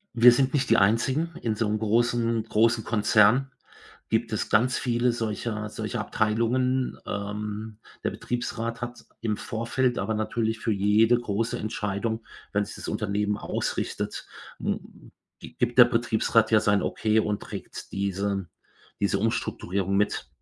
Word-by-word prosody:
Wir 120 Hz, +1 st, +9 dB
sind 130 Hz, +1 st, +2 dB
nicht 140 Hz, -5 st, +1 dB
die 115 Hz, -, +5 dB
einzigen. 130 Hz, +11 st, +2 dB
In 110 Hz, -2 st, -1 dB
so 110 Hz, 0 st, 0 dB
'nem 105 Hz, -, 0 dB
großen 115 Hz, +1 st, +1 dB
großen 115 Hz, 0 st, +2 dB
Konzern 115 Hz, +4 st, +3 dB, 0.6 s
gibt -, -, 0 dB
es -, -, -2 dB
ganz 125 Hz, +4 st, +3 dB
viele 120 Hz, 0 st, +1 dB
solcher 110 Hz, -1 st, -3 dB
solcher 110 Hz, +2 st, -4 dB
Abteilungen. 120 Hz, +5 st, 0 dB
Ähm, 105 Hz, +1 st, -5 dB, 0.3 s
der -, -, +1 dB
Betriebsrat 115 Hz, -1 st, -4 dB
hat 120 Hz, -1 st, -6 dB, 0.2 s
im 105 Hz, -2 st, -1 dB
Vorfeld 120 Hz, +2 st, -1 dB
aber 110 Hz, +3 st, -1 dB
natürlich 110 Hz, +1 st, -1 dB
für 110 Hz, -, -1 dB
jede 105 Hz, +4 st, +4 dB
große 115 Hz, +1 st, -2 dB
Entscheidung, 110 Hz, +1 st, -3 dB, 0.3 s
wenn 105 Hz, 0 st, +1 dB
sich -, -, -9 dB
das -, -, -8 dB
Unternehmen 105 Hz, 0 st, -1 dB
ausrichtet, -, -, -3 dB, 0.3 s
mm -, -, 0 dB, 0.7 s
gibt 120 Hz, 0 st, -3 dB
der 125 Hz, -, +11 dB
Betriebsrat 115 Hz, -2 st, +2 dB
ja 110 Hz, -, +6 dB
sein 105 Hz, -1 st, +2 dB
okay 110 Hz, 0 st, 0 dB
und 105 Hz, -1 st, -2 dB
trägt -, -, -8 dB
diesen 100 Hz, -1 st, -2 dB, 0.5 s
diese 100 Hz, -1 st, +1 dB
Umstrukturierung 100 Hz, -3 st, -1 dB
mit. 105 Hz, +1 st, 0 dB
110 Hz, 140 wpm, -26 LUFS, 105-120 Hz, 0.7 s, der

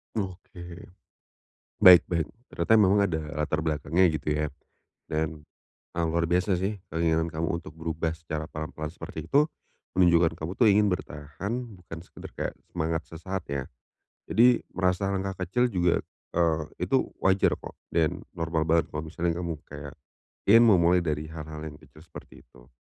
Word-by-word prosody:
Oke. 90 Hz, -2 st, -6 dB, 1.0 s
Baik 90 Hz, -2 st, +9 dB
baik. 85 Hz, -3 st, -1 dB, 0.3 s
Ternyata 85 Hz, +4 st, -1 dB
memang 100 Hz, 0 st, +5 dB
ada 80 Hz, -5 st, 0 dB
latar 75 Hz, +1 st, -1 dB
belakangnya 80 Hz, +4 st, +2 dB
gitu 75 Hz, -, -3 dB
ya, 75 Hz, 0 st, 0 dB, 0.6 s
dan, 80 Hz, -1 st, -2 dB, 0.5 s
eee, 85 Hz, -1 st, 0 dB
luar 85 Hz, +1 st, +1 dB
biasa 90 Hz, +2 st, +2 dB
sih 100 Hz, +3 st, -2 dB, 0.2 s
keinginan 80 Hz, 0 st, +1 dB
kamu 80 Hz, +1 st, -2 dB
untuk 80 Hz, -, -11 dB
berubah 80 Hz, 0 st, -2 dB
secara 80 Hz, -1 st, -5 dB
pelan-pelan 75 Hz, 0 st, -5 dB
seperti 80 Hz, 0 st, -7 dB
itu, 145 Hz, +2 st, +5 dB, 0.5 s
menunjukan 85 Hz, -2 st, +5 dB
kamu 80 Hz, +3 st, -4 dB
tuh 115 Hz, -, +5 dB
ingin 105 Hz, +1 st, +4 dB
bertahan 75 Hz, -, -5 dB, 0.3 s
bukan 85 Hz, -2 st, -9 dB
sekedar -, -, -12 dB
kayak -, -, -3 dB, 0.2 s
semangat 80 Hz, +1 st, -1 dB
sesaat 95 Hz, +2 st, -5 dB
ya. 70 Hz, -2 st, -2 dB, 0.7 s
Jadi 120 Hz, +1 st, +5 dB
merasa 95 Hz, +1 st, 0 dB
langkah 95 Hz, 0 st, -2 dB
kecil 125 Hz, +6 st, +2 dB
juga, 90 Hz, -2 st, +2 dB, 0.4 s
eee, 80 Hz, -2 st, +2 dB, 0.2 s
itu -, -, +1 dB
wajar 95 Hz, +1 st, +3 dB
kok -, -, -10 dB, 0.2 s
dan 85 Hz, +1 st, +1 dB
normal 80 Hz, -1 st, 0 dB
banget 80 Hz, +1 st, +3 dB
kalau 75 Hz, +1 st, -3 dB
misalnya 85 Hz, 0 st, -1 dB
kamu 85 Hz, -3 st, -3 dB
kayak 70 Hz, 0 st, -8 dB, 0.5 s
ingin 115 Hz, +3 st, +8 dB
memulai 90 Hz, -3 st, +5 dB
dari 75 Hz, -1 st, -2 dB
hal-hal 80 Hz, -1 st, -7 dB
yang 75 Hz, -, -9 dB
kecil 75 Hz, 0 st, -18 dB
seperti 85 Hz, -, -13 dB
itu -, -, -20 dB
85 Hz, 155 wpm, -27 LUFS, 80-90 Hz, 1.0 s, Baik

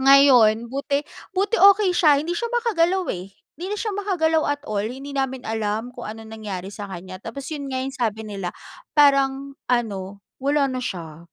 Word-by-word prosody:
Ngayon, 250 Hz, -4 st, +6 dB
buti 280 Hz, +1 st, -1 dB, 0.3 s
buti 405 Hz, +4 st, +2 dB
okey 395 Hz, 0 st, +7 dB
siya, 310 Hz, -5 st, +5 dB
hindi 325 Hz, +4 st, -2 dB
siya 470 Hz, +7 st, -2 dB
makagalaw, 385 Hz, -7 st, +1 dB
eh, 180 Hz, +1 st, -6 dB
hindi 265 Hz, -, -11 dB
na 415 Hz, -, -2 dB
siya 430 Hz, 0 st, -2 dB
makagalaw 350 Hz, -6 st, +1 dB
at 290 Hz, 0 st, -1 dB
all 210 Hz, -1 st, -1 dB
hindi 265 Hz, +5 st, -6 dB
namin 265 Hz, -2 st, -2 dB
alam 220 Hz, +2 st, -2 dB
kung 245 Hz, -3 st, -7 dB
anong 220 Hz, 0 st, -9 dB
nangyari 200 Hz, -3 st, -6 dB
sa 205 Hz, -1 st, -7 dB
kanya. 185 Hz, 0 st, -8 dB
Tapos 230 Hz, +6 st, -7 dB
'yun 285 Hz, -2 st, -4 dB
nga 260 Hz, -1 st, -2 dB
'yung 270 Hz, -, -4 dB
sabi 220 Hz, -4 st, -2 dB
nila 195 Hz, -4 st, -4 dB, 0.5 s
parang 275 Hz, -1 st, +4 dB, 0.2 s
ano 200 Hz, -5 st, -2 dB, 0.2 s
wala 285 Hz, +2 st, +2 dB
na 255 Hz, -1 st, -3 dB
siya. 165 Hz, -9 st, -5 dB
265 Hz, 180 wpm, -23 LUFS, 215-300 Hz, 0.5 s, okey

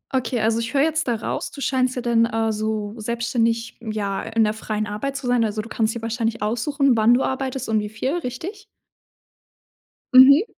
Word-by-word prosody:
Okay, 245 Hz, -2 st, 0 dB
also, 225 Hz, +1 st, +2 dB
ich 230 Hz, +3 st, -4 dB
höre 275 Hz, -, +4 dB
jetzt 315 Hz, -1 st, 0 dB
da 240 Hz, -, +1 dB
raus, 220 Hz, -, -4 dB
du -, -, -11 dB
scheinst 255 Hz, -2 st, 0 dB
ja 250 Hz, -, -4 dB
dann, 230 Hz, -1 st, +3 dB
also, 220 Hz, -2 st, -2 dB
selbstständig, 230 Hz, 0 st, -1 dB
ja 215 Hz, -3 st, -3 dB
in 225 Hz, 0 st, +1 dB
der 210 Hz, 0 st, +1 dB
freien 215 Hz, -1 st, -3 dB
Arbeit 210 Hz, +7 st, -4 dB
zu 275 Hz, -, -7 dB
sein. 245 Hz, -1 st, +2 dB
Also, 215 Hz, -1 st, -2 dB
du 230 Hz, -, -11 dB
kannst 220 Hz, 0 st, 0 dB
dir 235 Hz, -, -6 dB
wahrscheinlich 230 Hz, -1 st, -2 dB
aussuchen, 250 Hz, +4 st, +1 dB
wann 225 Hz, +2 st, +5 dB
du 260 Hz, -, +1 dB
arbeitest 265 Hz, -1 st, -3 dB
und 220 Hz, -1 st, +2 dB
wie 210 Hz, 0 st, -4 dB
viel, 255 Hz, +9 st, -2 dB
richtig? 345 Hz, -, -6 dB, 1.5 s
Mhm. 275 Hz, +8 st, +8 dB
230 Hz, 195 wpm, -22 LUFS, 220-260 Hz, 1.5 s, Mhm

